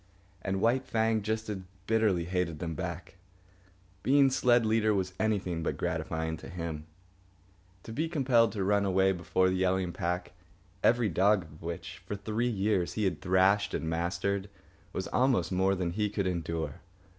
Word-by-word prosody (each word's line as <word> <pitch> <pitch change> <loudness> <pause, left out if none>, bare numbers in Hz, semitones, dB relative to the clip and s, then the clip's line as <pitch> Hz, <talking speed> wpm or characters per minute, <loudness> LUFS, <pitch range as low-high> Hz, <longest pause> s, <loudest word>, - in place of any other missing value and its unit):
And 95 0 -2
White 125 +4 +2
Fang 110 -1 +1
just 110 +2 -2
as 105 -2 -3 0.3
bitterly 105 -6 +2
hated 90 -3 -1
them 85 0 -4
back. 90 +3 -6 0.8
Being 135 0 +4
sled 120 -2 +3
leader 110 -1 +2
was 95 -1 -1
anything 100 -6 0
but 80 - -2
gratifying 80 0 -2
to - - -10
him. 85 -4 -5 1.0
To - - -8
be 160 +6 -1
compelled 130 -7 +3
to 100 -3 -2
run 100 +1 +2
away 95 0 +3
before 95 +1 +1
the 95 - 0
yelling 95 -1 +1
pack, 90 +1 -3 0.5
every 120 -1 +4
dog 95 +3 +3
of 75 -1 -15
which, 85 0 -6
for 105 - -4
three 110 +4 -1
years, 100 -4 0
he 110 - -1
had 95 -5 0
thrashed 95 +2 +3
and 80 - -3
mastered, 95 +4 -1 0.4
was 95 - -3
almost 125 -9 +2
more 95 +1 +2
than 90 -2 -2
he 105 +3 0
could 100 -1 -2
endure. 85 -5 -3
95 Hz, 165 wpm, -30 LUFS, 90-110 Hz, 1.0 s, Being